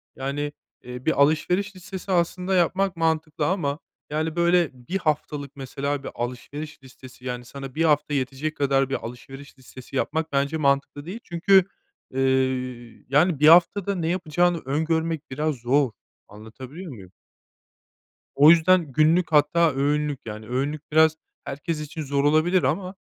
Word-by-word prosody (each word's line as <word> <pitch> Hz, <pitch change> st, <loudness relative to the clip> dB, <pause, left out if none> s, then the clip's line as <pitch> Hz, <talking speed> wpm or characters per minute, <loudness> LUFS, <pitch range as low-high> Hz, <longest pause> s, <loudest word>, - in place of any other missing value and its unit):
Yani, 140 Hz, +2 st, -3 dB, 0.3 s
eee, 125 Hz, 0 st, -9 dB
bir 160 Hz, -3 st, +2 dB
alışveriş 180 Hz, +7 st, +1 dB
listesi 190 Hz, +1 st, -7 dB
aslında 180 Hz, +2 st, 0 dB
yapmak 185 Hz, +2 st, +1 dB
mantıklı 160 Hz, -2 st, 0 dB
ama, 150 Hz, -6 st, -1 dB, 0.3 s
yani, 155 Hz, +2 st, -2 dB
böyle, 170 Hz, -1 st, +3 dB
1 125 Hz, +9 st, -5 dB
haftalık, 150 Hz, -4 st, -3 dB
mesela, 140 Hz, +1 st, -4 dB
bir -, -, -5 dB
alışveriş 135 Hz, +5 st, -6 dB
listesi, 130 Hz, -1 st, -15 dB
yani, 125 Hz, -1 st, -4 dB
sana 135 Hz, +1 st, -9 dB
1 165 Hz, -, +1 dB
hafta 150 Hz, -1 st, +2 dB
yetecek 140 Hz, +3 st, -2 dB
kadar 135 Hz, -1 st, +1 dB
bir 135 Hz, -, -1 dB
alışveriş 135 Hz, +3 st, -10 dB
listesi 130 Hz, +1 st, -12 dB
yapmak 160 Hz, +3 st, -1 dB
bence 140 Hz, +3 st, 0 dB
mantıklı 140 Hz, 0 st, 0 dB
değil. 195 Hz, +6 st, -6 dB
Çünkü, 185 Hz, +2 st, +3 dB, 0.5 s
eee, 135 Hz, -, -2 dB, 0.9 s
yani, 155 Hz, +2 st, +3 dB
1 150 Hz, -, +5 dB
haftada 180 Hz, +4 st, +5 dB
ne 170 Hz, -3 st, -2 dB
yapacağını 175 Hz, 0 st, +1 dB
öngörmek 160 Hz, +1 st, -1 dB
biraz 150 Hz, +2 st, -1 dB
zor. 130 Hz, +2 st, +1 dB, 0.4 s
Anlatabiliyor 130 Hz, -, -10 dB
muyum? 95 Hz, -7 st, -12 dB, 1.2 s
O 145 Hz, +3 st, +7 dB
yüzden 170 Hz, -2 st, +4 dB
günlük, 160 Hz, +5 st, +3 dB
hatta 155 Hz, +2 st, +4 dB
öğünlük, 145 Hz, 0 st, 0 dB
yani, 110 Hz, 0 st, -7 dB
öğünlük 140 Hz, +5 st, -3 dB
biraz 160 Hz, 0 st, +5 dB, 0.3 s
herkes 155 Hz, +2 st, -4 dB
için 155 Hz, +1 st, -6 dB
zor 140 Hz, 0 st, -1 dB
olabilir 155 Hz, +4 st, +3 dB
ama, 180 Hz, +8 st, -1 dB
150 Hz, 145 wpm, -24 LUFS, 135-170 Hz, 1.2 s, O